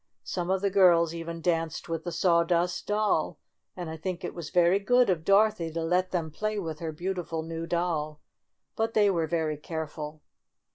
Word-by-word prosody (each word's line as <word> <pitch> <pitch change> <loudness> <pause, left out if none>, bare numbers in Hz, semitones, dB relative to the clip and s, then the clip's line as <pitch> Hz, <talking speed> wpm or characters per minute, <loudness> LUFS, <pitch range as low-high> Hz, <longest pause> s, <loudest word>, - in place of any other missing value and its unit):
Some 175 -1 -3
of 190 0 +1
the 200 -1 +1
girls 170 -4 +5
even 165 0 -6
danced 165 -2 -1
with 165 0 -4
the 175 - -3
Sawdust 170 +1 +1
Doll, 210 -6 +1 0.4
and 175 -2 -5
I 160 0 -6
think 175 +2 -4
it - - -4
was 170 -4 -7
very 175 +2 +4
good 245 +2 +4
of 165 -3 -1
Dorothy 200 -3 +3
to 165 0 -2
let 180 +3 +1
them 165 -4 -2
play 215 +6 -2
with 160 -6 -4
her 165 -1 -3
beautiful 170 -1 -3
new 165 0 -5
doll. 160 -3 -1 0.6
But 225 0 -1
they 205 -2 +5
were 165 -3 0
very 160 -2 -1
careful. 155 -1 -6
170 Hz, 185 wpm, -28 LUFS, 160-185 Hz, 0.6 s, girls